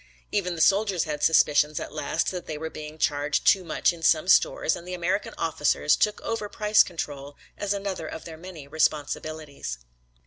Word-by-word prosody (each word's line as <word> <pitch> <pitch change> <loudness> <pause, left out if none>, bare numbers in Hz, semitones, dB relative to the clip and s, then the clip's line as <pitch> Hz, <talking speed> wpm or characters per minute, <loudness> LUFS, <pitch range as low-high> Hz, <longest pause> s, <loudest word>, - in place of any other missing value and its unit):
Even 180 -4 -1
the 165 - -3
soldiers 195 +1 +3
had 150 -2 -4
suspicions 150 -1 +3
at - - -7
last 140 - -1
that 180 -2 -6
they 155 - -4
were 160 +1 -5
being 155 0 -8
charged 145 -1 0
too 195 -2 +5
much 175 - +1
in 170 - -12
some 160 +1 +3
stores 180 - +3
and 175 - -10
the 180 - -4
American 180 +3 -2
officers 150 -1 +2
took 210 0 +1
over 220 -2 -3
price 210 0 +4
control 145 -4 -4 0.2
as 205 - -3
another 195 -5 -3
of 160 - -8
their 165 - -8
many 165 -3 -10
responsibilities. 150 - -2
160 Hz, 180 wpm, -26 LUFS, 150-185 Hz, 0.2 s, too